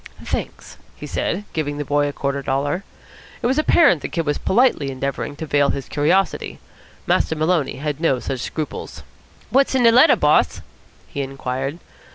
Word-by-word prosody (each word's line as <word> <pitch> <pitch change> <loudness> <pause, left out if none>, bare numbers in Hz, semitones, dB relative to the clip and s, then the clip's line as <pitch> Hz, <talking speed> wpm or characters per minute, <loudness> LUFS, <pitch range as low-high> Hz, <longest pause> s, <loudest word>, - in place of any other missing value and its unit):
"Thanks," - - -5 0.2
he - - -9
said, 205 - -2
giving 145 -2 -2
the 145 - -3
boy 145 +1 +1
a - - -2
quarter 140 0 -2
dollar. 140 +7 -1 0.6
It - - -1
was 260 +5 +2
apparent 285 - +4
the - - -4
Kid 165 -2 -2
was 145 -1 -1
politely 215 - +2
endeavouring 140 +2 -4
to 160 - -6
veil 145 -2 +2
his 135 - -3
curiosity. 175 +7 0 0.5
Master 160 - +1
Maloney 155 -2 0
had 150 0 -4
no 160 -6 +2
such 130 +1 -4
scruples. 155 +4 -5 0.5
"What's 270 +1 +3
in 255 - +3
de 230 - +7
letter, 250 +7 +6
boss?" - - +2 0.5
he 140 - -4
inquired. 135 +1 -4
145 Hz, 170 wpm, -21 LUFS, 140-180 Hz, 0.6 s, de